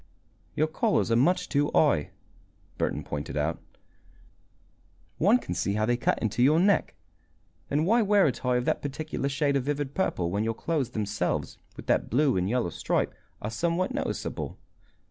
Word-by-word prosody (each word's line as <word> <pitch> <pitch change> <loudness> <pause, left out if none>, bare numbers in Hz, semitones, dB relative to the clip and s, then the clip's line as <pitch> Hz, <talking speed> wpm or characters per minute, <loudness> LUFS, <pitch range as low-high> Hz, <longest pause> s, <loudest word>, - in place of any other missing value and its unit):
"Your 155 - +3
collars 155 - +1
are - - +4
much 180 +9 +2
too 145 +1 +1
high," 140 - +3 0.7
Burton - - -1
pointed 75 0 -5
out. 80 +2 -1 1.6
"One 205 +9 +5
can - - -5
see 100 - -1
how 110 +1 +1
they 120 +2 +2
cut 120 - +1
into 110 +1 -1
your 150 +6 +5
neck. 200 +2 +2 0.7
Then 150 +3 +1
why 230 +6 +4
wear 205 -2 +4
a 145 - +3
tie 125 +1 -1
of 125 - -1
that - - 0
particular 145 0 -3
shade 140 0 +1
of 135 - +1
vivid 145 -1 -2
purple 90 - -1
when 100 +3 0
your 115 0 -1
clothes 150 -4 -1
themselves, 105 -3 -2 0.2
with - - -9
that - - +1
blue 135 +3 +3
and 90 +1 0
yellow 120 -6 0
stripe, - - -1 0.3
are 105 - -3
somewhat 170 - 0
noticeable? 280 - -3
140 Hz, 170 wpm, -27 LUFS, 110-165 Hz, 1.6 s, One